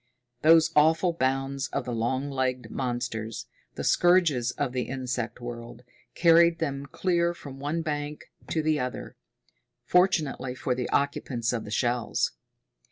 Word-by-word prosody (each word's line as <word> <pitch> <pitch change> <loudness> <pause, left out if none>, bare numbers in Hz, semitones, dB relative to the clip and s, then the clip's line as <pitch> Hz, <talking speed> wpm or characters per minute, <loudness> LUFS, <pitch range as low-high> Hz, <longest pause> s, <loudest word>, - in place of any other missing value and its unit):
Those 165 +1 +6
awful 160 +4 +4
bounds 135 -1 -1
of - - -3
the 125 - -3
long 130 +5 -1
legged 130 -3 -2
monsters, 120 -3 -3 0.3
the - - -4
scourges 170 -9 +3
of 130 +1 -2
the 125 -1 -3
insect 125 -3 -3
world, 120 0 -8 0.3
carried 170 0 +5
them 140 -3 -3
clear 175 +2 0
from 135 -4 -10
one 150 +4 -2
bank 150 -1 -4 0.2
to 160 - 0
the 155 -1 +1
other 125 0 -5 0.7
fortunately 160 -8 +1
for 130 - -1
the 125 -1 -3
occupants 125 -4 0
of 115 -2 -3
the - - -8
shells. 120 +1 0
135 Hz, 140 wpm, -27 LUFS, 125-160 Hz, 0.7 s, Those